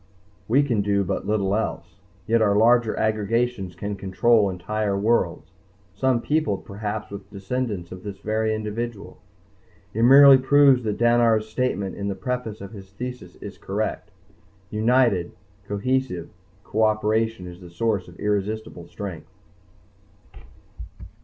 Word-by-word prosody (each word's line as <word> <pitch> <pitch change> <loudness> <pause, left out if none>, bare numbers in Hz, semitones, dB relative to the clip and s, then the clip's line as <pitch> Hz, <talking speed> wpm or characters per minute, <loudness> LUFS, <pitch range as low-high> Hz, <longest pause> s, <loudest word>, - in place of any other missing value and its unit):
We 135 +6 +4
can 120 -7 0
do 100 0 +1
but 95 - -3
little 100 -2 +1
else, 95 -4 -4 0.3
yet 115 +3 +2
our 100 -2 +3
larger 115 +1 +3
aggregations 110 -2 -1
can 100 +3 -4
control 100 +3 +2
entire 100 +2 -2
worlds, 100 -4 0 0.4
some 125 +3 +1
peopled 150 -10 0
perhaps 105 +1 -5
with 100 -1 -9
descendants 100 -2 -4
of 90 0 -8
this 100 0 -7
very 110 +2 -1
individual. 110 0 -5 0.7
It 115 - -2
merely 135 +2 +8
proves 135 -1 +5
that 105 -1 -1
Dannar's 120 -2 +3
statement 110 -4 -2
in 100 - -3
the 100 - -2
preface 125 -1 -4
of 100 0 -8
his 95 -3 -11
Thesis 120 -3 -8
is 100 -2 -9
correct._ 105 +3 -3 0.6
"United, 110 -5 +2 0.3
cohesive 105 -3 -2 0.3
cooperation 110 -1 0
is 90 +1 -10
the 90 - -11
source 100 +2 -1
of 85 0 -15
irresistible 105 +1 -3
strength." - - -8
110 Hz, 130 wpm, -23 LUFS, 100-120 Hz, 0.7 s, merely